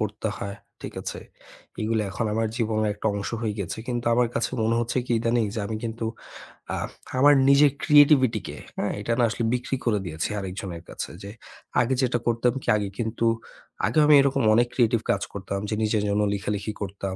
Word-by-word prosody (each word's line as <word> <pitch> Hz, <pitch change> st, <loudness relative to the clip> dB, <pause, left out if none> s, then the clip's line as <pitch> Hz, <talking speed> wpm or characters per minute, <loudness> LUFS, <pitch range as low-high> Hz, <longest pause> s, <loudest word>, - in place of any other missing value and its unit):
করতে 110 Hz, +1 st, -3 dB
হয়, 100 Hz, 0 st, -5 dB, 0.3 s
ঠিক -, -, -7 dB
আছে? -, -, -5 dB, 0.6 s
এগুলি 110 Hz, 0 st, +1 dB
এখন 115 Hz, -, -2 dB
আমার 115 Hz, 0 st, +1 dB
জীবনের 110 Hz, -2 st, 0 dB
একটা 105 Hz, -, -4 dB
অংশ 100 Hz, -, -3 dB
হয়ে 110 Hz, -2 st, -1 dB
গেছে। 95 Hz, +2 st, -4 dB
কিন্তু 120 Hz, -1 st, -2 dB
আমার 120 Hz, 0 st, +3 dB
কাছে 115 Hz, -, 0 dB
মনে 115 Hz, +1 st, +2 dB
হচ্ছে 120 Hz, +2 st, -2 dB
কি -, -, -1 dB
ইদানীং 115 Hz, 0 st, +1 dB
যে 110 Hz, -, -2 dB
আমি 110 Hz, -, -3 dB
কিন্তু, 115 Hz, 0 st, -3 dB, 0.7 s
আ -, -, -3 dB, 0.4 s
আমার 145 Hz, +2 st, +7 dB, 0.2 s
নিজের 140 Hz, 0 st, +6 dB
creativity 140 Hz, -6 st, +6 dB
কে, -, -, -7 dB, 0.2 s
হ্যাঁ, 105 Hz, -, -1 dB
এটা 110 Hz, -, -3 dB
না -, -, +4 dB
আসলে 115 Hz, +1 st, -3 dB
বিক্রি 125 Hz, +2 st, -1 dB
করে 110 Hz, -4 st, +2 dB
দিয়েছি 80 Hz, -2 st, -3 dB
আরেকজনের 95 Hz, -3 st, -6 dB
কাছে। -, -, -5 dB
যে 100 Hz, -, -7 dB, 0.5 s
আগে 125 Hz, +3 st, +1 dB
যেটা 125 Hz, -2 st, +1 dB
করতাম 120 Hz, +1 st, +2 dB
কি, -, -, -12 dB
আগে 100 Hz, -1 st, -2 dB
কিন্তু 115 Hz, 0 st, -1 dB, 0.6 s
আগে 120 Hz, -, +2 dB
আমি 150 Hz, -, +7 dB
এরকম 135 Hz, -2 st, +1 dB
অনেক 120 Hz, +1 st, +4 dB
creative 115 Hz, -2 st, +2 dB
কাজ 100 Hz, -, 0 dB
করতাম 100 Hz, 0 st, -4 dB
যে 110 Hz, -, -1 dB
নিজের 110 Hz, -1 st, +1 dB
জন্য 105 Hz, +1 st, +1 dB
লিখালিখি 105 Hz, +2 st, -3 dB
করতাম, 95 Hz, -1 st, -4 dB
110 Hz, 190 wpm, -25 LUFS, 100-120 Hz, 0.7 s, আমার